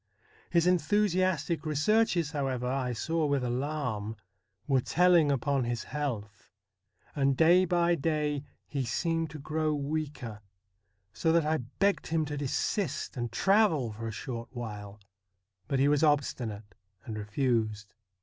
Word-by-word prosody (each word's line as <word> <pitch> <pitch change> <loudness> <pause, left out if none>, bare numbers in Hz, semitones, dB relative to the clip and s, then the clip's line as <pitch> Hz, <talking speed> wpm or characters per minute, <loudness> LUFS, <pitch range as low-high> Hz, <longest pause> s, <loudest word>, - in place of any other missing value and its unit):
His 170 -1 +3
enthusiastic 180 -2 +1
researches, 165 +1 +2
however, 135 -4 -2
I 130 0 -1
saw 160 +7 -1
with 140 -2 +1
alarm, 125 -4 -2 0.5
were 135 -3 +2
telling 175 -1 +4
upon 140 0 +1
his 120 -1 -2
health, 110 -9 -5 0.7
and 135 -2 +2
day 175 +3 +6
by 175 -1 +2
day 150 -2 0 0.2
he 140 -2 -3
seemed 165 +6 -1
to 155 - -8
grow 155 +1 -1
weaker, 140 -7 -4 0.7
so 160 - +1
that 165 -1 +3
I 155 +1 +2
begged 175 +11 -1
him 160 -1 0
to 145 0 -4
desist, 150 - -2
and 120 -3 -3
travel 190 - +3
for 115 +2 -6
a - - -3
short 115 +1 -6
while; 105 -4 -7 0.7
but 135 - 0
he 135 +2 +4
was 145 0 +3
obstinate 120 -9 0 0.3
and 110 - -5
refused. 110 -1 -1
145 Hz, 135 wpm, -29 LUFS, 120-165 Hz, 0.7 s, day